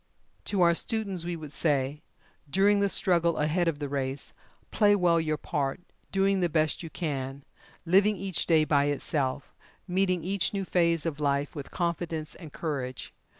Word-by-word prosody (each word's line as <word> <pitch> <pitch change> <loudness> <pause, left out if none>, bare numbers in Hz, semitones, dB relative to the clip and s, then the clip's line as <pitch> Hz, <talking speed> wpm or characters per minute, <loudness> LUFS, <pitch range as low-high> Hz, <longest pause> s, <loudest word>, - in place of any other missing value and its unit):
To 200 -3 0
our 170 -1 +6
students, 195 -2 -1
we 175 0 -2
would 155 -3 -8
say: 145 -2 0 0.5
During 200 +5 +4
the 200 0 +2
struggle 170 -3 +2
ahead 160 +4 +1
of 165 -3 0
the 145 -1 -4
race, 135 0 -3 0.4
play 205 -1 +4
well 175 -4 +3
your 155 -1 -1
part, 140 -4 -2 0.3
doing 195 0 +2
the 175 -1 +1
best 155 -1 +1
you 165 - -7
can, 140 -5 -4 0.4
living 195 +5 +4
each 190 -7 -2
day 160 -2 +5
by 145 -2 +3
itself, 140 -1 -1 0.3
meeting 185 -2 +1
each 195 +2 0
new 195 -1 -2
phase 170 -3 +1
of 155 -3 -3
life 140 -1 0
with 145 -2 -6
confidence 170 -2 -2
and 160 -4 -11
courage. 135 -6 -4
165 Hz, 165 wpm, -28 LUFS, 145-185 Hz, 0.5 s, our